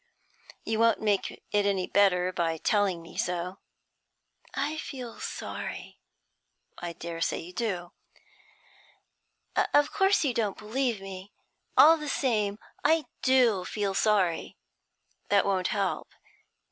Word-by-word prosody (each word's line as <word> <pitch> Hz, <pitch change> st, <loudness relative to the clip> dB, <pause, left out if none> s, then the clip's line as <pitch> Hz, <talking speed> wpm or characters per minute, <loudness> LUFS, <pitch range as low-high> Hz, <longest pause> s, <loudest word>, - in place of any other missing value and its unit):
You 220 Hz, 0 st, -1 dB
won't 230 Hz, 0 st, +4 dB
make 205 Hz, -3 st, +1 dB, 0.2 s
it 205 Hz, -1 st, +2 dB
any 190 Hz, -2 st, +1 dB
better 185 Hz, -2 st, +3 dB
by 165 Hz, -2 st, 0 dB
telling 195 Hz, -2 st, +1 dB
me 165 Hz, -, -13 dB
so.' 180 Hz, +1 st, -2 dB, 1.0 s
'I 290 Hz, +3 st, -1 dB
feel 255 Hz, -6 st, -7 dB
sorry.' -, -, -6 dB, 0.8 s
'I 175 Hz, -1 st, -5 dB
dare 165 Hz, 0 st, -6 dB
say -, -, +1 dB
you 175 Hz, +2 st, -8 dB
do.' 180 Hz, -4 st, -3 dB, 1.6 s
'Of 290 Hz, +1 st, +3 dB
course 390 Hz, -2 st, +3 dB
you 260 Hz, -, +1 dB
don't 215 Hz, -4 st, -1 dB
believe 230 Hz, 0 st, -1 dB
me. 195 Hz, 0 st, -8 dB, 0.5 s
All 325 Hz, +1 st, +9 dB
the 300 Hz, -2 st, -5 dB
same, 210 Hz, -8 st, 0 dB, 0.3 s
I 320 Hz, +1 st, +3 dB, 0.2 s
do 245 Hz, -7 st, +4 dB
feel 200 Hz, +1 st, -2 dB
sorry.' 190 Hz, -5 st, +1 dB, 0.7 s
'That 200 Hz, -1 st, +4 dB
won't 190 Hz, -2 st, +1 dB
help.' 200 Hz, -3 st, -2 dB
205 Hz, 120 wpm, -28 LUFS, 180-245 Hz, 1.6 s, All